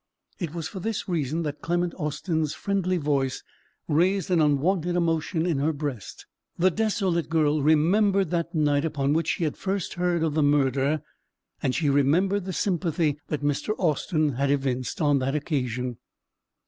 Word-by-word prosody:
It 170 Hz, -4 st, -4 dB
was 165 Hz, -2 st, -3 dB
for 190 Hz, -, -7 dB
this 220 Hz, +3 st, -3 dB
reason 165 Hz, -2 st, -1 dB
that 150 Hz, -1 st, -4 dB
Clement 175 Hz, 0 st, 0 dB
Austin's 155 Hz, -1 st, -2 dB
friendly 190 Hz, -2 st, 0 dB
voice 140 Hz, -4 st, -1 dB, 0.4 s
raised 180 Hz, +4 st, +1 dB
an 170 Hz, -3 st, +4 dB
unwonted 165 Hz, +4 st, +1 dB
emotion 165 Hz, -1 st, 0 dB
in 165 Hz, -6 st, 0 dB
her 150 Hz, +3 st, +1 dB
breast. 140 Hz, -8 st, -6 dB, 0.3 s
The 185 Hz, +2 st, +3 dB
desolate 195 Hz, -5 st, 0 dB
girl 155 Hz, -2 st, +2 dB
remembered 185 Hz, +5 st, +3 dB
that 170 Hz, 0 st, -2 dB
night 145 Hz, -2 st, +2 dB
upon 145 Hz, -3 st, 0 dB
which 165 Hz, 0 st, 0 dB
she 175 Hz, -, 0 dB
had 155 Hz, -, -1 dB
first 195 Hz, -1 st, -2 dB
heard 175 Hz, -2 st, 0 dB
of 160 Hz, -2 st, 0 dB
the 155 Hz, -, +1 dB
murder, 145 Hz, 0 st, +2 dB, 0.6 s
and 130 Hz, -, 0 dB
she 160 Hz, -, 0 dB
remembered 170 Hz, +8 st, +2 dB
the 190 Hz, -, -3 dB
sympathy 165 Hz, -5 st, 0 dB
that 150 Hz, -1 st, -3 dB
Mr. 145 Hz, +9 st, 0 dB
Austin 155 Hz, -2 st, +1 dB
had 140 Hz, +1 st, +1 dB
evinced 135 Hz, +4 st, -1 dB
on 145 Hz, -2 st, +3 dB
that 135 Hz, +2 st, -1 dB
occasion. 125 Hz, -5 st, -2 dB
155 Hz, 160 wpm, -26 LUFS, 145-175 Hz, 0.6 s, an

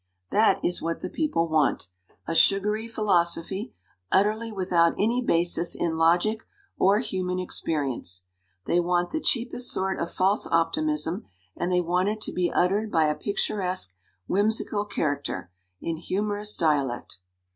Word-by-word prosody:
" -, -, -52 dB
That 215 Hz, -2 st, +4 dB
is 175 Hz, -, 0 dB
what 165 Hz, +1 st, -3 dB
the -, -, -5 dB
people 230 Hz, -, 0 dB
want 155 Hz, -, +1 dB, 0.4 s
a 165 Hz, -, -1 dB
sugary 210 Hz, +6 st, +3 dB
philosophy, 190 Hz, -, 0 dB, 0.4 s
utterly 215 Hz, +3 st, +2 dB
without 180 Hz, -4 st, +2 dB
any 230 Hz, +4 st, +1 dB
basis 170 Hz, -5 st, +2 dB
in 165 Hz, -2 st, -1 dB
logic 175 Hz, +7 st, +2 dB, 0.3 s
or 200 Hz, +2 st, +4 dB
human 185 Hz, -5 st, -2 dB
experience. 140 Hz, -, -2 dB, 0.4 s
They 175 Hz, -, +2 dB
want 175 Hz, 0 st, 0 dB
the 315 Hz, -, -2 dB
cheapest 245 Hz, 0 st, +1 dB
sort 190 Hz, 0 st, -1 dB
of 170 Hz, -, -3 dB
false 195 Hz, +3 st, +1 dB
optimism, 220 Hz, -, 0 dB, 0.3 s
and 180 Hz, -, -2 dB
they 180 Hz, 0 st, +3 dB
want 180 Hz, +3 st, +1 dB
it 215 Hz, +1 st, -3 dB
to -, -, -2 dB
be 180 Hz, -1 st, 0 dB
uttered 205 Hz, +4 st, +1 dB
by 160 Hz, -1 st, +3 dB
a 150 Hz, -, 0 dB
picturesque, 185 Hz, -, -1 dB, 0.3 s
whimsical 205 Hz, +1 st, +1 dB
character, 145 Hz, -, -3 dB, 0.3 s
in 165 Hz, -1 st, -3 dB
humorous 205 Hz, +4 st, -2 dB
dialect. 140 Hz, -, 0 dB
180 Hz, 145 wpm, -26 LUFS, 165-210 Hz, 0.4 s, That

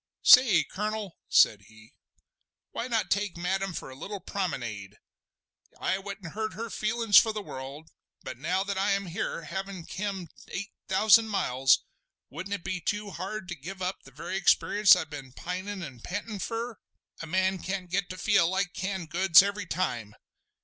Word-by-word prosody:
"Say, 235 Hz, -10 st, +8 dB
Colonel," 210 Hz, -2 st, -4 dB
said 105 Hz, -2 st, +5 dB
he, 110 Hz, 0 st, -18 dB, 0.8 s
"why 235 Hz, -, -4 dB
not 230 Hz, -3 st, -1 dB
take 200 Hz, -3 st, 0 dB
Madame 190 Hz, +2 st, -1 dB
for 150 Hz, -, -6 dB
a -, -, -10 dB
little 195 Hz, +8 st, -6 dB
promenade? 110 Hz, -, -4 dB, 0.8 s
I 190 Hz, -, 0 dB
wouldn't 195 Hz, -4 st, -8 dB
hurt 215 Hz, 0 st, -3 dB
her 230 Hz, 0 st, -5 dB
feelin's 215 Hz, -1 st, +3 dB
for 225 Hz, -, +1 dB
the 215 Hz, -, -4 dB
world; 140 Hz, +1 st, -8 dB, 0.3 s
but 130 Hz, -2 st, -7 dB
now 180 Hz, +6 st, 0 dB
that 200 Hz, -1 st, -3 dB
I 200 Hz, +1 st, +2 dB
am 200 Hz, 0 st, -1 dB
here, 170 Hz, -1 st, -4 dB
havin' 190 Hz, +2 st, -6 dB
kem 190 Hz, -2 st, -4 dB, 0.2 s
eight 200 Hz, +3 st, -5 dB, 0.2 s
thousand 220 Hz, +3 st, +5 dB
miles, 135 Hz, -10 st, +2 dB, 0.5 s
wouldn't 185 Hz, +7 st, -4 dB
it 185 Hz, -, -9 dB
be 185 Hz, -1 st, -3 dB
too 205 Hz, +3 st, -2 dB
hard 190 Hz, +2 st, -5 dB
to 175 Hz, -, -4 dB
give 175 Hz, +7 st, -8 dB
up 185 Hz, +1 st, -3 dB
the -, -, -15 dB
very 170 Hz, +7 st, -5 dB
experience 200 Hz, +1 st, +5 dB
I've 160 Hz, -3 st, -4 dB
been 135 Hz, -3 st, -8 dB
pinin' 185 Hz, +4 st, -5 dB
an' 135 Hz, -6 st, -9 dB
pantin' 205 Hz, -, -5 dB
fur? 230 Hz, +2 st, -4 dB, 0.4 s
A 165 Hz, -, -6 dB
man 190 Hz, +2 st, +1 dB
can't 190 Hz, -1 st, -4 dB
get 190 Hz, 0 st, 0 dB
to 185 Hz, -, -6 dB
feel 170 Hz, -2 st, +3 dB
like 190 Hz, 0 st, -1 dB
canned 190 Hz, -4 st, -4 dB
goods 180 Hz, 0 st, +7 dB
every 200 Hz, -2 st, -3 dB
time! 120 Hz, -, -2 dB
190 Hz, 170 wpm, -28 LUFS, 165-200 Hz, 0.8 s, Say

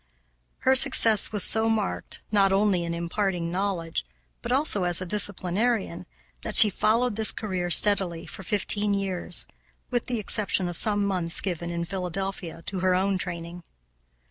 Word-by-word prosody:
Her 265 Hz, -, +2 dB
success 235 Hz, -5 st, +4 dB
was 210 Hz, -3 st, +1 dB
so 220 Hz, 0 st, +1 dB
marked, 220 Hz, -3 st, -2 dB
not 200 Hz, -2 st, +1 dB
only 195 Hz, -2 st, 0 dB
in 170 Hz, 0 st, -5 dB
imparting 170 Hz, 0 st, -4 dB
knowledge, 180 Hz, -, -4 dB, 0.4 s
but -, -, -7 dB
also 260 Hz, -7 st, +1 dB
as 175 Hz, -1 st, +5 dB
a 185 Hz, -, -6 dB
disciplinarian, 205 Hz, +1 st, -2 dB, 0.3 s
that -, -, -7 dB
she 210 Hz, -, +10 dB
followed 225 Hz, +3 st, -1 dB
this 220 Hz, -1 st, +3 dB
career 185 Hz, -5 st, -5 dB
steadily 180 Hz, -2 st, +3 dB
for -, -, -11 dB
fifteen 205 Hz, +2 st, 0 dB
years, 190 Hz, -3 st, 0 dB, 0.5 s
with 245 Hz, -1 st, -3 dB
the 250 Hz, -2 st, -3 dB
exception 200 Hz, -3 st, +2 dB
of 175 Hz, -, -7 dB
some 205 Hz, +2 st, +1 dB
months 180 Hz, -4 st, 0 dB
given 175 Hz, -3 st, -5 dB
in 170 Hz, 0 st, -5 dB
Philadelphia 185 Hz, -2 st, -7 dB
to 190 Hz, -, -5 dB
her 185 Hz, 0 st, 0 dB
own 190 Hz, +1 st, -2 dB
training. 170 Hz, -1 st, -7 dB
195 Hz, 155 wpm, -24 LUFS, 175-210 Hz, 0.5 s, she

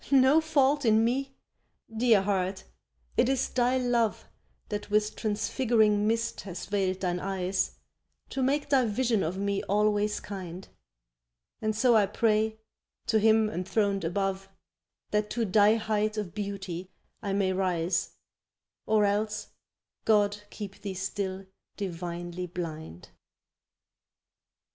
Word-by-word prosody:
No 275 Hz, +3 st, +6 dB
fault 290 Hz, -2 st, +2 dB
in 220 Hz, -1 st, +4 dB
me? 270 Hz, +3 st, -1 dB, 0.6 s
Dear 225 Hz, -3 st, +4 dB
Heart, 190 Hz, -1 st, -1 dB, 0.5 s
it 240 Hz, +1 st, +4 dB
is 270 Hz, -1 st, +1 dB
thy 250 Hz, +1 st, +2 dB
love 240 Hz, -3 st, +1 dB, 0.4 s
That 210 Hz, -1 st, -4 dB
with 210 Hz, 0 st, +1 dB
transfiguring 215 Hz, -1 st, +2 dB
mist 230 Hz, +1 st, -1 dB
has 180 Hz, -3 st, -7 dB
veiled 190 Hz, -1 st, -1 dB
thine 180 Hz, -1 st, 0 dB
eyes 190 Hz, 0 st, -1 dB, 0.5 s
To 270 Hz, -, -3 dB
make 280 Hz, +3 st, +1 dB
thy 265 Hz, -3 st, +4 dB
vision 225 Hz, 0 st, +1 dB
of 175 Hz, +2 st, -2 dB
me 200 Hz, 0 st, -1 dB
always 210 Hz, +1 st, +1 dB
kind; 185 Hz, -2 st, -7 dB, 0.9 s
And 215 Hz, 0 st, 0 dB
so 240 Hz, +2 st, +4 dB
I 210 Hz, -2 st, +5 dB
pray, 220 Hz, +1 st, +1 dB, 0.5 s
to 220 Hz, -, +3 dB
Him 220 Hz, 0 st, +4 dB
enthroned 200 Hz, 0 st, 0 dB
above, 195 Hz, +2 st, -2 dB, 0.6 s
That 210 Hz, 0 st, +1 dB
to 230 Hz, +1 st, -1 dB
thy 210 Hz, +2 st, +5 dB
height 215 Hz, -1 st, -1 dB
of 200 Hz, -6 st, -3 dB
beauty 195 Hz, -3 st, -5 dB, 0.3 s
I 200 Hz, -2 st, -2 dB
may 195 Hz, -1 st, +1 dB
rise, 180 Hz, -2 st, 0 dB, 0.7 s
Or 215 Hz, -1 st, +4 dB
else 210 Hz, +1 st, -1 dB, 0.6 s
God 205 Hz, -1 st, +3 dB
keep 200 Hz, -2 st, -8 dB
thee 195 Hz, -2 st, -5 dB
still 190 Hz, 0 st, -3 dB, 0.3 s
divinely 175 Hz, -1 st, -4 dB
blind. 160 Hz, -, -7 dB
205 Hz, 125 wpm, -28 LUFS, 190-220 Hz, 0.9 s, No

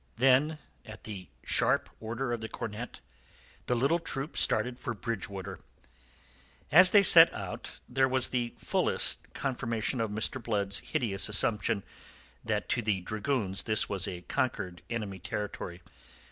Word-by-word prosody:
Then 135 Hz, +5 st, +4 dB, 0.3 s
at 110 Hz, 0 st, -12 dB
the 100 Hz, -4 st, -7 dB, 0.2 s
sharp -, -, +2 dB
order 120 Hz, +3 st, -3 dB
of 115 Hz, -, -3 dB
the 110 Hz, -, -5 dB
cornet, 110 Hz, +3 st, -6 dB, 0.7 s
the 125 Hz, -, +1 dB
little 140 Hz, +8 st, +2 dB
troop 145 Hz, -2 st, -5 dB
started 125 Hz, 0 st, +2 dB
for -, -, -4 dB
Bridgewater. 100 Hz, -4 st, -5 dB, 1.1 s
As 180 Hz, +5 st, +9 dB
they 200 Hz, +1 st, +6 dB
set 170 Hz, -3 st, +9 dB
out 95 Hz, -3 st, -6 dB, 0.2 s
there 130 Hz, +1 st, +2 dB
was 130 Hz, -1 st, +1 dB
the 120 Hz, -2 st, -2 dB
fullest -, -, 0 dB
confirmation 120 Hz, -3 st, -2 dB
of 110 Hz, -, -1 dB
Mr. 110 Hz, +5 st, -1 dB
Blood's 100 Hz, -4 st, -1 dB
hideous 100 Hz, +1 st, -2 dB
assumption 105 Hz, 0 st, +2 dB, 0.6 s
that 110 Hz, -2 st, -2 dB
to 120 Hz, -, +1 dB
the 105 Hz, -4 st, 0 dB
dragoons 105 Hz, 0 st, -1 dB
this 110 Hz, -2 st, +1 dB
was 95 Hz, -1 st, -2 dB
a 90 Hz, -3 st, -5 dB
conquered 95 Hz, -9 st, -2 dB
enemy 105 Hz, -5 st, -4 dB
country. 95 Hz, -3 st, -5 dB
115 Hz, 140 wpm, -30 LUFS, 100-130 Hz, 1.1 s, As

